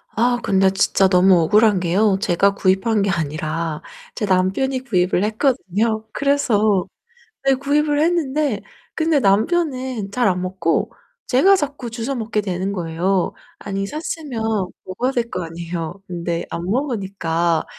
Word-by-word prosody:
아 240 +2 +2
근데 190 0 +3
진짜 195 0 +3
너무 180 -1 +5
억울한 210 +3 +4
게요. 190 +3 +2
제가 195 0 +3
구입한 195 +3 +2
게 200 - +1
아니라 155 -1 -2 0.3
제 210 - -2
남편이 195 +8 +1
구입을 185 -3 +1
했거든요. 220 -2 0
그래서 220 -9 +2 0.6
네 270 - +5
구입을 290 +2 +1
했는데. 300 -7 +1 0.3
근데 315 -2 +2
남편은 255 - 0
잘 240 +1 +1
안 180 -1 +1
먹고 185 +3 -1 0.4
제가 380 +11 +5
자꾸 285 -7 -3
주워 235 +4 -4
먹게 220 -2 -1
되는 190 0 -2
거예요. 180 +2 -1 0.3
아니 195 -1 -3
샀으면 300 -3 -5 0.5
먹어야 240 +8 -2
될 240 -3 -1
거 180 -1 -3
아니에요. 165 0 -5
근데 170 -1 -3
안 170 - -4
먹으니까 190 - -1
205 Hz, 285 characters per minute, -20 LUFS, 180-255 Hz, 0.6 s, 너무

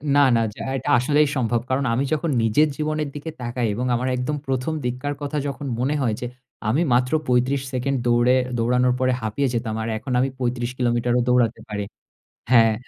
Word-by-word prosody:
না, 145 - +6
না 115 - +3
য্যা - - -6
এটা 135 - -4
আসলেই 150 +4 +3
সম্ভব। 120 -1 +1
কারণ 135 +1 +1
আমি 125 +4 +1
যখন 160 +2 -1
নিজের 115 +8 +4
জীবনের 155 -1 -1
দিকে 145 +2 -5
তাকাই 120 0 -1
এবং 125 +3 -2
আমার 125 +2 -1
একদম 145 +4 -2
১ম 130 +4 -1
দিককার 125 +4 -2
কথা 145 +1 -3
যখন 140 +1 -5
মনে 135 +4 +1
হয় 115 -5 +1
যে 125 - -2 0.4
আমি 140 +9 +2
মাত্র 125 +1 +2 0.2
৩৫ 125 +2 +2
সেকেন্ড 135 +2 0
দৌড়ে 120 +2 +4 0.2
দৌড়ানোর 125 +2 +2
পরে 130 0 +2
হাঁপিয়ে 110 +6 -1
যেতাম। 115 -2 -2
আর - - -3
এখন 130 +3 -6
আমি 135 - +2
৩৫ 120 -1 -1
কিলোমিটারও 120 0 +1
দৌড়াতে 120 -2 +2
পারি। 105 -1 -3 0.7
হ্যাঁ, 115 -3 +6
125 Hz, 185 wpm, -23 LUFS, 120-140 Hz, 0.7 s, না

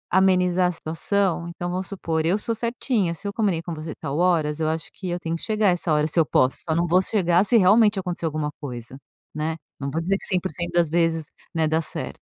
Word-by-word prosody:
amenizar 185 -1 +4
a - - 0
situação 170 +2 -1
então 175 +1 -5
vamos 185 +1 -3
supor, 165 -5 -2
eu 180 +5 +3
sou 230 +2 -1
certinha, 230 -4 -1
se 195 +5 -7
eu 200 - -3
comunico 175 -6 -1
com 155 - -7
você 155 -1 -6
tal 140 +2 -4
horas, 160 -4 +2
eu 160 - 0
acho 160 0 -4
que 185 - -6
eu 175 0 -2
tenho 165 -1 -3
que 165 - -7
chegar 215 -2 +2
essa 175 -2 0
hora, 150 0 +3
se 160 - 0
eu 160 - +5
posso, 130 -1 +2
só 160 - +1
não 170 +1 +2
vou 180 +2 +4
chegar 180 -3 +2
se 230 +3 +4
realmente 210 +1 +5
acontecer 180 -2 -3
alguma 155 -1 -2
coisa, 125 -3 -6 0.4
né, 155 +2 -2 0.2
não 140 -1 -3
vou 155 - -2
dizer 190 +4 +1
que - - -7
100% 175 -2 -2
das 175 -1 +3
vezes, 165 -1 +1 0.3
né, 160 -1 +1
dá 160 +1 +1
certo. - - -5
170 Hz, 235 wpm, -24 LUFS, 160-190 Hz, 0.4 s, eu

